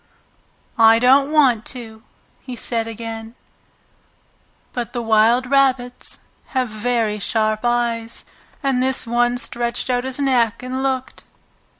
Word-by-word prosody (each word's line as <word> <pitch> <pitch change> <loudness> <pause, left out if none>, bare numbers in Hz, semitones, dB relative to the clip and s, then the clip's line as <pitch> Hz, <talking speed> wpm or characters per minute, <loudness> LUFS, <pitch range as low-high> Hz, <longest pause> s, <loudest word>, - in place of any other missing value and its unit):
"I 225 0 +7
don't 270 +4 +4
want 260 -8 +4
to!" 220 -2 -10 0.4
he 255 - -8
said 230 -1 -2
again. 225 0 -7 1.4
But 240 -2 -4
the 240 - -2
wild 225 +3 +3
rabbits 255 -2 0 0.4
have 255 -2 +1
very 215 -1 -1
sharp 215 0 0
eyes. 235 -1 -1 0.4
And 270 -2 +1
this 260 0 +1
one 240 +1 +1
stretched 240 +1 -2
out 245 0 0
his 260 -1 -4
neck 250 -5 +1
and 255 +1 -3
looked. 260 -1 -3
240 Hz, 120 wpm, -20 LUFS, 225-255 Hz, 1.4 s, I